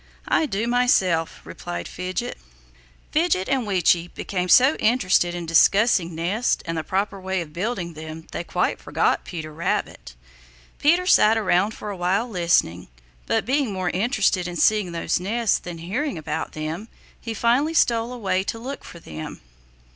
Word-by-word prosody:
"I 315 - +2
do 210 -2 -2
myself," 190 -10 +2
replied 85 0 -6
Fidget. 185 +7 -4 0.7
Fidget 310 - +1
and 265 -4 0
Weechi 175 -3 +2
became 180 -2 -3
so 260 - +7
interested 190 -6 +2
in 175 -1 -5
discussing 175 +1 +3
nests 190 +9 0
and 165 -1 -3
the 160 - -2
proper 195 +2 -2
way 190 0 -2
of 160 -3 -7
building 180 -2 -3
them 155 +1 -9
they - - -4
quite - - -1
forgot - - 0
Peter 155 -3 -7
Rabbit. 65 - -3 0.6
Peter 345 +5 +3
sat 225 - +5
around 205 0 +1
for 210 - -6
a - - -5
while 190 +6 0
listening, 170 - +1 0.4
but - - +1
being 265 -1 +1
more 185 -2 -2
interested 200 -3 +1
in 175 - -6
seeing 205 +1 +2
those 170 0 -1
nests 220 +4 0
than 175 -1 -8
hearing 210 - -3
about 155 0 -4
them, 155 +7 -5 0.3
he 225 -1 -5
finally 255 +9 +2
stole 235 -4 +2
away 195 -6 -1
to 225 - -3
look 260 +5 -7
for - - -11
them. 80 - -8
190 Hz, 160 wpm, -23 LUFS, 170-235 Hz, 0.7 s, so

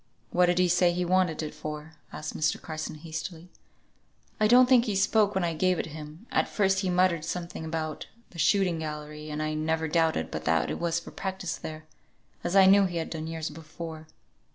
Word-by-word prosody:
"What 180 0 +4
did 175 0 +2
he 180 0 +4
say 175 0 +4
he 180 +1 -1
wanted 180 -3 +2
it 150 - -5
for?" 150 +1 -7 0.2
asked 150 - -6
Mr. 155 -1 +1
Carson, 155 -1 -5
hastily. 160 +2 -7 0.9
"I 215 - +4
don't 250 +3 +7
think 250 -2 +5
he 210 -4 -1
spoke 205 +1 +3
when 190 - +1
I 170 -1 0
gave 185 +2 +2
it - - -2
him. 155 +5 -9
At - - +1
first 195 -2 +2
he 190 -2 -1
muttered 180 -3 +2
something 170 0 -4
about 160 -1 -4 0.2
the 170 - -11
shooting 180 0 +3
gallery, 150 0 -6
and 150 0 -3
I 155 0 -1
never 160 +1 0
doubted 160 - +1
but 80 0 -5
that 80 0 +2
it - - -4
were 170 0 -1
for 170 +1 -2
practice 190 -2 -4
there, 155 0 -8 0.6
as 175 +2 -1
I 195 -1 +8
knew 195 +1 +7
he 175 -2 -3
had 165 - -3
done 160 -1 -4
years 160 -1 -4
before." 160 0 -8
165 Hz, 205 wpm, -28 LUFS, 155-185 Hz, 0.9 s, I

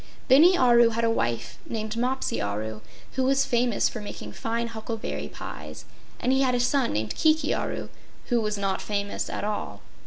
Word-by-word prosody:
Bini 335 +8 +7
Aru 240 -3 +6
had 230 0 -2
a 230 - +3
wife 120 - -2
named 220 -1 -4
Mopsi 255 +3 -1
Aru 105 +1 -3 0.3
who 260 - -1
was 275 +1 +3
famous 240 -2 +2
for 220 - -5
making 205 - -7
fine 230 +1 -2
huckleberry 225 0 -4
pies, - - -8 0.3
and 250 - +1
he 265 - +3
had 255 -2 +2
a - - +1
son 250 +1 +2
named 110 +1 -1
Kiki 310 -1 +2
Aru - - -3 0.4
who 240 -2 +3
was 210 -1 -1
not 195 -1 -1
famous 200 -1 -2
at - - -4
all. 210 0 -3
230 Hz, 180 wpm, -26 LUFS, 205-255 Hz, 0.4 s, Bini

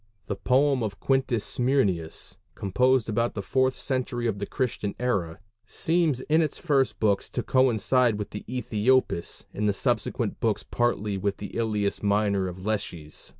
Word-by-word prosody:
The 100 - -3
poem 135 +2 +2
of 105 -3 -3
Quintus 130 -5 +1
Smyrnæus, 110 - 0 0.2
composed 125 +5 +2
about 115 +2 0
the 100 - -3
fourth 130 +4 +1
century 125 -2 -2
of 105 -4 -1
the 100 - -3
Christian 120 -6 -2
era, 100 -10 -1 0.3
seems 160 -6 +1
in 155 +4 +2
its 155 -3 -1
first 140 -6 +1
books 105 -2 +1
to 120 - -3
coincide 125 -1 +3
with 105 -1 -5
Æthiopis, 120 -2 0
in 105 +1 -1
the 105 - +2
subsequent - - -1
books - - 0
partly 105 -4 0
with 100 +1 -1
the 100 - -8
Ilias 105 -3 0
Minor 100 -2 +1
of 90 0 -6
Lesches. 85 -8 -4
115 Hz, 150 wpm, -26 LUFS, 100-130 Hz, 0.3 s, coincide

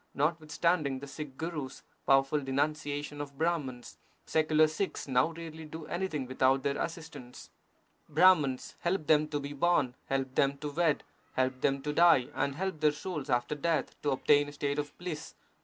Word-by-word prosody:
Notwithstanding 155 -1 +1
the 135 - -7
Sikh 140 -1 -8
Gurus 155 -5 -5 0.2
powerful 135 +2 +4
denunciation 145 +1 -2
of 140 -1 -8
Brahmans, 145 -7 -2 0.3
secular 155 0 +3
Sikhs 155 +4 -3
now 130 +1 +3
rarely 165 -1 -8
do 160 +1 -8
anything 170 -7 -2
without 130 +1 +2
their 140 0 -1
assistance. 160 -7 -7 0.6
Brahmans 150 -5 +4
help 175 -2 -1
them 155 0 +4
to 150 -1 -2
be 140 0 -6
born, 145 -4 +2
help 135 -1 -1
them 140 +1 +2
to 150 +1 -5
wed, 160 -1 +1 0.3
help 130 0 0
them 135 -1 +1
to 150 0 -2
die, 165 -6 +5
and 140 -1 -1
help 190 -1 -3
their 150 -1 +4
souls 150 -1 -5
after 120 +3 +1
death 160 +2 -1
to 145 - 0
obtain 145 +2 +3
a - - -11
state 145 0 -1
of 145 0 -5
bliss. 175 -4 -6
150 Hz, 165 wpm, -31 LUFS, 135-160 Hz, 0.6 s, die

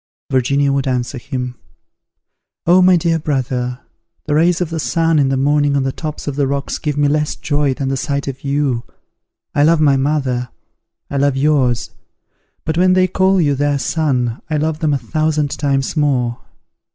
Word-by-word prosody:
Virginia 140 +2 +2
would 140 -1 0
answer 125 0 -2
him, 125 -2 -5 1.1
"Oh, 180 +2 +5
my 185 0 +6
dear 165 -1 +1
brother, 130 -4 -2 0.4
the 150 - -1
rays 170 +3 +3
of 175 -3 -2
the 165 - -2
sun 165 0 +1
in 135 -2 +3
the 135 - 0
morning 145 +1 +2
on 140 - +1
the 135 - -1
tops 155 +2 -6
of 145 - -2
the 140 -1 +1
rocks 140 0 -3
give 150 -2 -2
me 145 0 +3
less 150 +1 0
joy 145 -3 0
than 135 -1 -2
the 135 - 0
sight 140 +1 -2
of 135 -1 -6
you. 140 -4 0 0.7
I 145 - +2
love 160 +2 +4
my 145 -3 +4
mother, 135 -3 -1 0.6
I 140 - -1
love 140 -1 +2
yours; 130 -6 +1 0.7
but 160 +1 -1
when 185 0 +4
they 185 0 +4
call 190 +1 +2
you 145 -4 +2
their 145 +1 0
son, 130 -4 -1
I 155 - 0
love 155 +1 -1
them 155 -3 +1
a - - +1
thousand 150 +3 -1
times 140 -1 0
more. 130 -6 0
145 Hz, 185 wpm, -17 LUFS, 135-155 Hz, 1.1 s, my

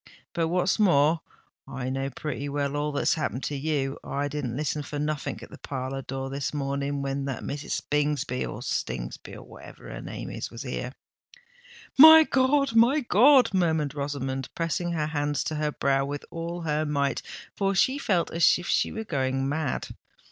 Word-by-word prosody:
But 165 -2 0
what's 180 +4 +1
more, 160 -5 +4 0.5
I 135 -1 -4
know 135 +1 -2
pretty 145 +1 -5
well 140 0 -2
all 150 +1 -1
that's 145 - +1
happened 140 -4 -3
to 145 - -2
you. 140 -1 -1
I 140 +1 -2
didn't 135 -4 -3
listen 150 0 -1
for 145 0 -6
nothink 150 0 -3
at - - -12
the - - -11
parlour 135 0 -4
door 135 0 -5
this 140 +1 -3
morning 140 0 -2
when 135 0 -2
that 135 -3 -4
Mrs. 145 0 -4
Bingsby 145 -3 0
or - - -6
Stingsby, 65 -1 -4
or - - -10
whatever - - -13
her - - -7
name - - -7
is, - - -5
was 115 - -8
here." 125 -1 -4 1.1
"My 315 +2 +11
God! 275 -2 +2
my 240 +6 +5
God!" 255 +1 +5
murmured 160 -6 +1
Rosamond, 135 -2 -3
pressing 170 +1 -1
her 155 -2 0
hands 145 -2 -1
to 155 - -3
her 150 0 0
brow 135 -1 +1
with 145 +1 -5
all 170 +1 -5
her 155 -1 0
might—for 150 +7 -2
she 260 +8 +3
felt 185 -10 0
as 170 0 +4
if 175 - -8
she - - +1
were 220 - -4
going 135 -6 -1
mad. 145 -1 -2
145 Hz, 175 wpm, -26 LUFS, 135-170 Hz, 1.1 s, My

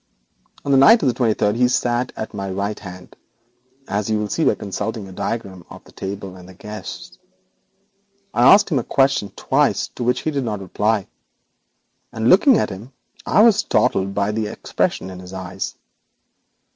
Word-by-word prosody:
On 140 - 0
the 135 - +5
night 225 - +7
of - - +2
the 125 - +2
twenty 115 -3 +1
third 105 0 +1
he 125 +1 +3
sat 125 0 0
at 110 - -5
my 100 -1 -4
right 100 +2 -3
hand, 90 -2 -11 0.7
as 105 +1 -2
you 110 - +1
will 105 -1 -3
see - - -1
by - - +3
consulting 105 +2 -4
your 95 -1 -11
diagram 95 -3 -4
of - - -12
the - - -18
table 95 -1 -6
and 90 0 -13
the 95 - -14
guests. 105 +3 -9 1.1
I - - +6
asked 205 +1 +6
him 140 - +2
a - - -3
question 135 -7 +1
twice, - - +1
to 125 - -6
which 125 +1 +1
he 155 - -2
did 140 -2 -2
not 105 -4 -3
reply, 105 +2 -1 1.1
and 115 +1 +1
looking 225 +6 +6
at - - -1
him 110 +8 -10 0.3
I 210 - +5
was 225 -3 +6
startled 100 - +1
by 100 +1 0
the 110 0 -2
expression 95 -2 -2
in 90 - -9
his 90 0 -11
eyes. 95 0 -5
105 Hz, 185 wpm, -20 LUFS, 95-125 Hz, 1.1 s, night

